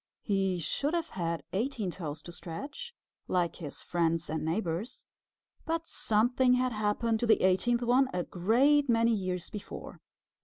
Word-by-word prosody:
He 195 -3 +1
should 275 - -1
have 335 -1 -1
had 170 -2 -3
eighteen 220 -2 -1
toes 155 -4 -6
to 175 - -8
stretch, 285 - -7 0.3
like 175 -2 0
his 150 -5 -7
friends 165 -2 0
and 160 - -2
neighbors, 175 +7 -2 0.6
but 330 0 -2
something 245 +1 +2
had 255 0 +1
happened 220 +2 0
to 240 - 0
the 220 - +4
eighteenth 235 +6 +3
one 255 +2 +3
a 180 -1 -1
great 260 +12 +3
many 230 0 +4
years 185 -3 -3
before. 210 - -8
210 Hz, 150 wpm, -30 LUFS, 175-250 Hz, 0.6 s, the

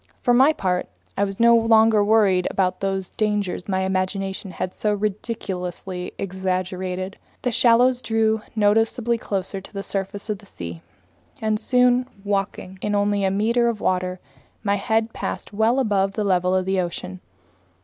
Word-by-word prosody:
For 245 - +2
my 265 +5 +6
part, 180 -10 -1 0.3
I 200 - +1
was 195 -1 -3
no 235 0 +6
longer 225 -2 +5
worried 205 -4 +3
about 185 -2 0
those 195 -1 -2
dangers 210 -3 -1
my 190 -1 +1
imagination 190 +1 -2
had 185 0 -4
so 210 -1 0
ridiculously 190 -4 -4
exaggerated. 185 0 -3 0.2
The 250 - +1
shallows 245 +2 +4
drew 220 -1 +1
noticeably 225 +2 +2
closer 195 -2 -3
to - - -14
the 200 -1 -5
surface 195 +1 -4
of 210 -3 -3
the 205 - -17
sea, 85 - -8 0.6
and 215 -1 0
soon, 250 0 +3 0.2
walking 195 -2 -3
in 210 0 -1
only 205 0 +1
a 190 - +3
meter 230 +5 +2
of 225 -3 -3
water, 185 -1 -1 0.4
my 200 -1 +1
head 225 +2 0
passed - - -5
well 220 +4 +2
above 200 -5 +1
the 210 - -1
level 185 -2 +2
of 185 -1 +1
the 190 0 +1
ocean. 95 - -5
200 Hz, 160 wpm, -23 LUFS, 185-220 Hz, 0.6 s, my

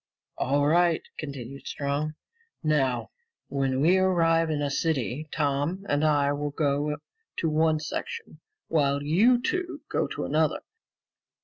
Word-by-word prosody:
"All 145 +2 +2
right," 170 +2 +3 0.2
continued 140 -2 -7
Strong. 145 +2 -2 0.5
"Now, 135 -6 +1 0.4
when 135 -1 0
we 180 +5 +5
arrive 165 -3 +3
in 155 -2 0
a 140 - -1
city, 140 - -1
Tom 150 +6 -1
and 145 +1 +1
I 145 -2 +3
will 145 0 -2
go 145 0 0 0.4
to 165 - 0
one 155 0 +2
section, 450 - -5 0.3
while 140 -3 +1
you 210 +12 +4
two 350 +3 -2
go - - 0
to - - -4
another. - - +1
150 Hz, 130 wpm, -27 LUFS, 140-165 Hz, 0.5 s, we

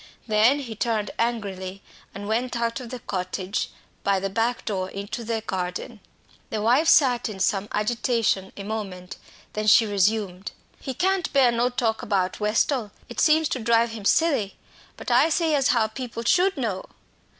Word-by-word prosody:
Then 225 +6 +4
he 235 -5 -6
turned 215 -2 -1
angrily, 195 -5 -3 0.3
and 200 +1 -7
went 240 +3 -1
out 235 +2 -1
of 250 -2 -8
the 255 - -5
cottage 185 0 -3 0.3
by 200 -1 +2
the 195 0 -3
back 230 +3 -1
door 190 -3 -2
into 200 +5 -6
the 225 0 -2
garden. 180 -4 -4 0.5
The 220 - -2
wife 245 +9 +3
sat 250 -7 +4
in 200 -3 -7
some 195 +1 0
agitation 215 -3 0
a 200 - -6
moment, 195 -4 -5 0.4
then 215 0 -2
she 225 +2 +7
resumed. 200 -2 0 0.3
"He 265 - -5
can't 380 +2 0
bear 265 -3 +5
no 235 +1 +1
talk 230 -3 -1
about 190 -3 -1
Westall 215 +2 +1 0.2
it - - -6
seems 315 0 +4
to 260 - -2
drive 230 0 +2
him 225 -2 -7
silly. 275 -9 +2 0.4
But - - -5
I 260 +7 +5
say 325 0 +1
as 280 -2 +3
how 235 -3 +3
people 230 +1 -6
should 370 +9 +3
know." 215 -8 -2
225 Hz, 170 wpm, -24 LUFS, 200-245 Hz, 0.5 s, she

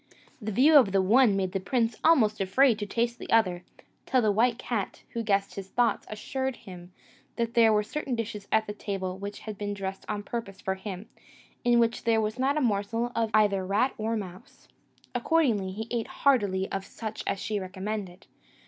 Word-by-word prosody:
The 215 0 -3
view 285 +9 +6
of 220 -9 +5
the 195 - +4
one 225 +2 +5
made 190 -2 -1
the 195 - -1
prince 225 +3 0
almost 220 -11 +4
afraid 225 +4 +3
to 205 - -3
taste 235 +3 -1
the - - -9
other, 185 -6 +2 0.4
till 255 -2 +2
the 215 - +3
white 230 +3 +2
cat, 225 -6 -4
who 235 - -3
guessed 200 -3 0
his 195 -1 -7
thoughts, 240 +2 +1
assured 260 +4 -3
him 180 -3 -12 0.4
that 230 -1 -2
there 230 -2 +5
were 210 -1 +3
certain 275 +2 -3
dishes 210 -3 -5
at 220 0 +2
table 190 -2 -4
which 200 +1 -6
had 215 -3 -7
been 205 0 -3
dressed 195 -1 -5
on 205 -1 -3
purpose 205 -3 -6
for 190 - -2
him, 190 +1 -7 0.6
in 240 0 +4
which 230 0 +1
there 225 -1 +3
was 220 +3 -2
not 275 +3 +1
a - - +1
morsel 225 +1 0
of 230 -1 +1
either 200 -3 +3
rat 205 +8 +1
or 225 +1 -1
mouse: 185 -3 -10 0.5
accordingly, 245 -7 +1
he 220 +4 -5
ate 235 -2 -1
heartily 205 -9 +1
of 195 0 -2
such 220 +2 -7
as - - 0
she 210 +1 -2
recommended. 190 0 -5
215 Hz, 195 wpm, -28 LUFS, 195-235 Hz, 0.6 s, view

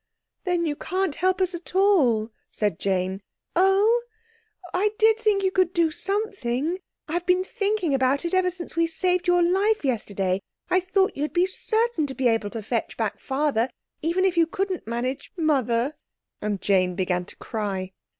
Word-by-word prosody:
"Then 350 -2 +1
you 300 -2 -1
can't 370 +1 -1
help 370 +4 +1
us 370 0 +1
at 345 +1 -8
all," 270 - +3 0.2
said 205 -6 -1
Jane; 190 0 -1 0.3
"oh—I 440 0 0
did 440 0 +4
think 420 -3 +2
you 380 - +2
could 370 -2 +2
do 335 -2 +2
something; 365 - -1 0.3
I've 345 +3 -3
been 365 0 +3
thinking 400 - -1
about 270 +3 +2
it 340 - -2
ever 370 -1 +3
since 355 -1 -8
we 335 0 +3
saved 360 +2 0
your 355 0 +4
life 390 +2 +2
yesterday. 200 -6 -1 0.3
I 365 - +5
thought 380 +1 +1
you'd 295 +2 -2
be 355 +1 +4
certain 435 -3 0
to 265 - -6
be 260 - +2
able 225 -3 +1
to 225 0 -6
fetch 230 +2 -2
back 220 -3 -2
Father, 265 -3 0 0.3
even 340 +4 +1
if 370 -2 +1
you 330 -1 +5
couldn't 375 - -3
manage 245 +3 -3
Mother." 270 -4 +1 0.5
And 205 -3 -2
Jane 185 -3 +2
began 180 -1 0
to - - -8
cry. 195 -4 -4
340 Hz, 170 wpm, -25 LUFS, 235-380 Hz, 0.5 s, I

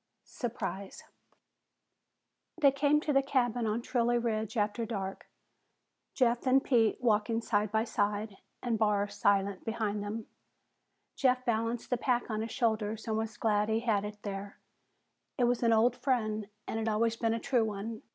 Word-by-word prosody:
SURPRISE 200 -5 -5 1.6
They 280 -4 +6
came 290 +2 +2
to 300 - 0
the 275 - +5
cabin 245 -4 0
on 220 +2 -1
Trilley 240 -1 +1
Ridge 220 -1 -2
after 210 +2 0
dark, 195 -4 -4 0.9
Jeff 245 -1 +2
and 265 +1 +5
Pete 230 -5 +3
walking 225 -1 +2
side 210 -3 0
by 220 0 +2
side 205 -2 -1 0.3
and 235 -3 0
Barr 205 -2 +2
silent 200 -1 +1
behind 215 -2 -2
them. 210 +2 -4 0.9
Jeff 255 -1 +2
balanced 230 +1 -1
the 250 - +2
pack 245 -1 0
on 215 0 -1
his 225 - -4
shoulders 220 -2 -1
and 220 - 0
was 220 0 -3
glad 210 -1 +1
he 220 +1 +1
had 215 -4 +1
it 210 0 -6
there. 200 0 -6 0.8
It 250 - +2
was 245 0 +2
an 230 -1 +3
old 225 +2 +4
friend 215 -6 -1 0.2
and 225 - -2
had 225 0 0
always 225 +1 +1
been 225 0 0
a - - -2
true 245 -1 +2
one. 215 +1 -5
225 Hz, 160 wpm, -31 LUFS, 210-240 Hz, 1.6 s, They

